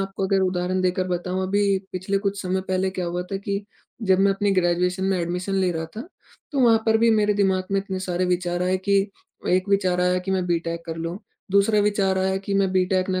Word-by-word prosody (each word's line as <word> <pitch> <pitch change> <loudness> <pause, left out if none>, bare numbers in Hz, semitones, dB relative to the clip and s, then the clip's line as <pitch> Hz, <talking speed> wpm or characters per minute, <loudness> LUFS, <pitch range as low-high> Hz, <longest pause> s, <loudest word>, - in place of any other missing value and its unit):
आपको 195 0 -2
अगर 195 0 +2
उदाहरण 185 0 0
देकर 185 0 0
बताऊँ, 180 +1 -2
अभी 200 0 +2
पिछले 190 +2 -1
कुछ 200 -1 -2
समय 190 +1 -1
पहले 190 0 0
क्या 185 -1 -4
हुआ 175 +1 -2
था - - 0
कि 200 +1 -3 0.4
जब 190 -3 +3
मैं 195 0 +4
अपनी 205 +1 0
ग्रेजुएशन 180 0 +1
में 190 -1 +1
एडमिशन 180 +3 -2
ले 185 -2 +2
रहा 160 -1 -3
था, - - -4 0.5
तो 275 - +1
वहाँ 230 -2 +5
पर 220 0 +4
भी 230 0 +4
मेरे 210 -1 +3
दिमाग 190 -2 +1
में 195 - +3
इतने 190 -1 -5
सारे 185 -1 -1
विचार 180 0 -1
आए 185 +1 +1
कि 200 0 +4 0.5
एक 185 +2 +2
विचार 185 -3 +2
आया 180 0 +2
कि 180 +1 -5
मैं 190 -1 +1
बी 170 -1 +2
टेक 170 0 -5
कर 165 -1 -5
लूँ। 165 +3 -4 0.3
दूसरा 200 +2 +4
विचार 200 -2 +1
आया 190 0 +1
कि 200 - -1
मैं 195 -1 +2
बी 185 -1 +3
टेक 185 0 0
ना 185 0 0
190 Hz, 235 wpm, -23 LUFS, 180-200 Hz, 0.5 s, वहाँ